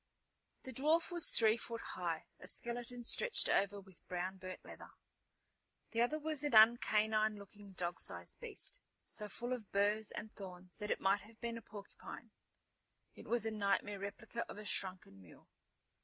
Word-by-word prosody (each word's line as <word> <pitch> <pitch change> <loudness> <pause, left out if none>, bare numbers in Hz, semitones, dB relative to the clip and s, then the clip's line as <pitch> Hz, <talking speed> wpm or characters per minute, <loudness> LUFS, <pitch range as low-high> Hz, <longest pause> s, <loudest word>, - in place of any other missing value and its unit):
The 260 - -7
dwarf 310 +7 +2
was 345 -1 +5
three 220 0 +5
foot 230 0 -6
high, 170 -3 -2
a - - -7
skeleton 240 +1 -1
stretched 485 - +1
over 200 +1 +2
with 190 -3 -17
brown 185 +1 -2
burnt 185 0 -8
leather. - - -10 1.0
The 230 - +1
other 245 +6 +3
was 305 -1 -1
an 290 -5 +1
un 220 +2 +10
canine 215 -1 +2
looking 200 0 -12
dog 175 -1 -3
sized - - -3
beast, 485 +1 -8 0.3
so 210 -1 -7
full 240 +4 -3
of 230 -5 -6
burrs 205 +2 +2
and 215 0 -6
thorns 180 -2 -10
that 210 0 -4
it - - 0
might 195 +1 +3
have 220 +3 -16
been 235 -1 -3
a 230 - -6
porcupine. 205 -2 -10 0.8
It - - -12
was 235 -2 +3
a 225 - 0
nightmare 205 -1 +1
replica 225 +4 -4
of - - -7
a 210 - -7
shrunken 185 - -1
mule. 85 -4 -16
215 Hz, 170 wpm, -37 LUFS, 195-235 Hz, 1.0 s, un